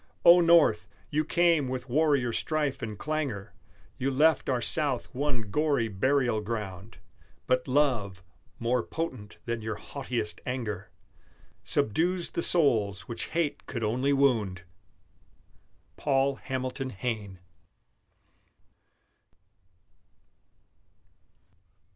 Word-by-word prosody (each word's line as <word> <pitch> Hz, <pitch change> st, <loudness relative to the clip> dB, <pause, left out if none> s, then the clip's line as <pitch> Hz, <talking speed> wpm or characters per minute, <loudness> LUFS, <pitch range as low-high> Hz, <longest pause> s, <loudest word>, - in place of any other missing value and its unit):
O 175 Hz, +1 st, +9 dB
North! 165 Hz, -10 st, +5 dB, 0.2 s
you 155 Hz, +1 st, +2 dB
came 170 Hz, -4 st, +3 dB
with 130 Hz, 0 st, -4 dB
warrior 140 Hz, -3 st, +2 dB
strife 150 Hz, -1 st, -1 dB
and 110 Hz, -2 st, -5 dB
clangor; 135 Hz, -10 st, -3 dB, 0.5 s
You 135 Hz, +1 st, 0 dB
left 150 Hz, +4 st, +3 dB
our 130 Hz, -2 st, +1 dB
South 135 Hz, -1 st, -1 dB
one 125 Hz, -6 st, -2 dB
gory 140 Hz, -6 st, +1 dB
burial 120 Hz, +2 st, +1 dB
ground; 105 Hz, -2 st, -5 dB, 0.5 s
But 125 Hz, 0 st, +1 dB
love, 120 Hz, -10 st, +1 dB, 0.3 s
more 120 Hz, +1 st, +1 dB
potent 130 Hz, -9 st, -5 dB
than 115 Hz, -1 st, -2 dB
your 110 Hz, 0 st, -3 dB
haughtiest 125 Hz, -6 st, -4 dB
anger, 110 Hz, -6 st, -4 dB, 0.7 s
Subdues 170 Hz, -, 0 dB
the -, -, -2 dB
souls 110 Hz, -, +2 dB
which 115 Hz, -, -4 dB
hate 165 Hz, -3 st, -2 dB
could 115 Hz, -, -4 dB
only 125 Hz, +6 st, +1 dB
wound! 115 Hz, -10 st, +2 dB, 1.3 s
PAUL 135 Hz, -1 st, +1 dB
HAMILTON 130 Hz, +1 st, -4 dB
HAYNE. 105 Hz, -3 st, -4 dB
130 Hz, 100 wpm, -28 LUFS, 110-145 Hz, 1.3 s, O